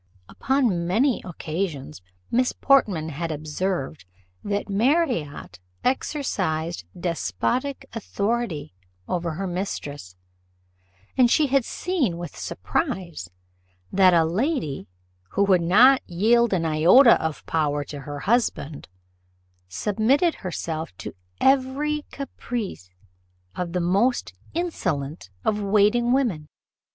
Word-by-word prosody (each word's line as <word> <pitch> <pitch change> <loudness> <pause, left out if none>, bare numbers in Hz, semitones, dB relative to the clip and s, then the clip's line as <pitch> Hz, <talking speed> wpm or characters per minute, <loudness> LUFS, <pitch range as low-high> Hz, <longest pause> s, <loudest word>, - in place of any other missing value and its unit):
Upon 235 -11 0
many 235 +8 +2
occasions 160 - -4 0.3
Miss 250 +1 +2
Portman 200 - +2
had 165 +2 -4
observed, 155 - -3 0.4
that 205 0 -2
Marriott 205 - 0 0.2
exercised 185 - -1
despotic 170 - -2
authority 205 - -2 0.3
over 170 -2 -2
her 195 +5 -4
mistress; 145 - -5 1.0
and 250 -2 +5
she 305 - +4
had 275 -1 +2
seen, 295 - -1
with 175 0 -7
surprise, 180 - -3 0.6
that 185 -2 +5
a 165 -1 +4
lady, 185 - -1 0.5
who 200 - +3
would 190 -3 +4
not 240 +11 +6
yield 230 +6 +3
an 175 -4 +1
iota 170 - +6
of 160 -1 -3
power 145 -2 0
to 145 +1 -8
her 145 +1 -7
husband, 195 - 0 0.8
submitted 225 - +2
herself 160 - -4
to - - -7 0.3
every 275 +3 +1
caprice 240 - -5 0.7
of 175 -1 -4
the 180 - +1
most 200 - +1 0.2
insolent 165 - -2 0.2
of 210 -1 +1
waiting 210 +4 +3
women. 225 - +1
190 Hz, 105 wpm, -24 LUFS, 160-245 Hz, 1.0 s, not